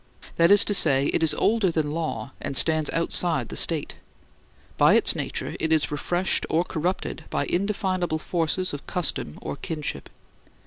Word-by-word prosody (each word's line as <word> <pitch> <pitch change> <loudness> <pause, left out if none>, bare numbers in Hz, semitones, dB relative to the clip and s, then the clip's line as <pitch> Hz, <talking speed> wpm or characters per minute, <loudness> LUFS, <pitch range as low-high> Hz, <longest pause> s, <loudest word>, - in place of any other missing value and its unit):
That 170 0 +4
is 205 0 +8
to 205 - +1
say, 140 -7 +3
it - - 0
is 160 - +6
older 220 -4 +1
than 155 -3 -2
law, 160 -4 -4
and 135 - -4
stands 155 0 +2
outside 165 -5 0
the - - -7
State. 160 -4 0 0.8
By - - +4
its - - +4
nature - - -4
it 160 - -1
is 155 -2 +1
refreshed 175 +5 -1
or 165 +2 +1
corrupted 180 +1 -4
by - - -1
indefinable 185 -3 -1
forces 170 +2 -2
of 145 - -8
custom 155 - -2
or - - -5
kinship. 155 -3 -5
165 Hz, 165 wpm, -24 LUFS, 155-180 Hz, 0.8 s, is